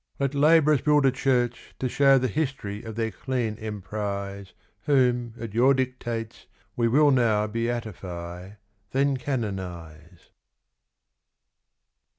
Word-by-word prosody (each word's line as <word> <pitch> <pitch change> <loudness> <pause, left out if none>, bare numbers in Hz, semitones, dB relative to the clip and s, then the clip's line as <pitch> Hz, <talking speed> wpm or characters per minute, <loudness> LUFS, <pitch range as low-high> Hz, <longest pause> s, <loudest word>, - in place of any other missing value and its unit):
Let 140 0 0
labourers 150 -1 +4
build 150 -1 +3
a 135 - +5
church 125 -2 -1
to 130 - -1
shew 135 +2 +4
The 130 0 +1
history 130 -7 -3
of 110 -2 -8
their 110 -1 -1
clean 120 -4 -2
emprise 100 -2 -5 0.3
Whom, 125 -4 +2
at 115 -3 -6
your 130 +4 +4
dictates, 120 -3 -4 0.3
we 120 -1 +2
will 145 +5 +4
now 115 -5 +3
Beatify, 100 -5 -5 0.4
then 140 +1 +2
canonise. 90 - -6
115 Hz, 115 wpm, -26 LUFS, 105-135 Hz, 0.4 s, a